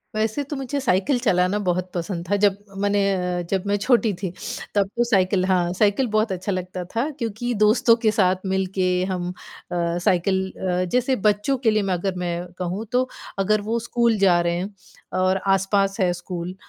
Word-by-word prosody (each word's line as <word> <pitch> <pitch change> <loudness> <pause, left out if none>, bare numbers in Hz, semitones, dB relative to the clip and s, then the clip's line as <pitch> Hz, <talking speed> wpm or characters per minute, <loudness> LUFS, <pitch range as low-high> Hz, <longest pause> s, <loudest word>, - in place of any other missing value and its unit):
वैसे 220 +6 0
तो 285 +2 -6
मुझे 270 +1 -3
साइकिल 245 +2 +1
चलाना 185 -4 +2
बहुत 185 -2 -1
पसंद 175 0 -3
था 205 - +3
जब 200 -1 +4 0.2
मैंने 205 0 +1 0.4
अ, - - -1
जब 190 -2 0
मैं 200 - +2
छोटी 230 +1 +2
थी। 190 - -1 0.5
तब 200 -1 +3
तो 240 - +4
साइकिल 190 -5 +2
हाँ, 180 -2 +2
साइकिल 210 +6 +2
बहुत 215 0 +2
अच्छा 185 +2 -3
लगता 185 -1 -4
था 245 +7 +1
क्योंकि 235 +1 -2
दोस्तों 230 +2 +5
के 215 - +5
साथ 190 -4 +3
मिल 190 0 0
के 185 -1 +2 0.2
हम 180 -1 -2
अ, 180 - -12 0.2
साइकिल 185 +2 +2
अ, 180 -1 -1
जैसे 250 +1 +2
बच्चों 210 +6 +1
के 235 -3 +2
लिए 215 0 +2
मैं 190 - +1
अगर 185 +1 -2
मैं 175 0 -3
कहूँ 185 +4 -3
तो 255 +1 +2 0.3
अगर 210 +2 +2
वो 220 +3 -1
स्कूल 235 -1 +1
जा 190 -3 +4
रहे 170 0 0
हैं 190 +4 -4 0.4
और 185 +1 +2
आस-पास 195 +1 +2
है 180 -2 +3
स्कूल, 175 0 -6
195 Hz, 190 wpm, -23 LUFS, 185-220 Hz, 0.5 s, दोस्तों